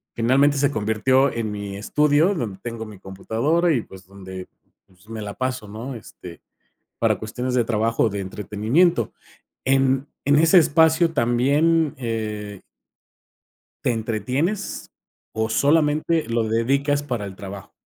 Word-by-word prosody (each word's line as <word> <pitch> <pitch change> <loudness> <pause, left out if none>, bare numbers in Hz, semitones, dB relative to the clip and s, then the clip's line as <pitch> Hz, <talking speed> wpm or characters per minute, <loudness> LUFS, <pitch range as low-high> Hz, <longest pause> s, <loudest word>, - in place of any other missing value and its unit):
Finalmente, 135 +5 +3
se 140 +1 +2
convirtió 125 +5 +2
en 115 -2 -3
mi 100 -1 -6
estudio, 150 - +2
donde 110 - -4
tengo 115 -2 -6
mi 105 -3 -12
computadora 125 - 0
y, 120 - +1
pues, 95 -1 -14
donde 95 -1 -9 0.6
me 110 -1 -6
la 100 -1 -5
paso, 130 -3 -3
¿no?, 115 +5 -7
este 90 -5 -11 0.6
para - - +2
cuestiones 125 +4 -4
de 120 -2 +3
trabajo 115 +1 +1
o - - +3
de 100 - -4
entretenimiento 105 - 0 0.5
en 135 +1 +2 0.2
en 145 +1 +4
ese 165 +3 +6
espacio 160 +1 +4
también, 145 +6 +2
eh 105 -4 -4 1.2
¿Te - - +2
entretienes, 125 - -2 0.4
o 110 0 -1
solamente 155 +3 +2
lo 115 0 0
dedicas 140 +6 +1
para 120 -7 -3
el 95 -1 -7
trabajo? 100 0 -9
120 Hz, 135 wpm, -22 LUFS, 105-145 Hz, 1.2 s, ese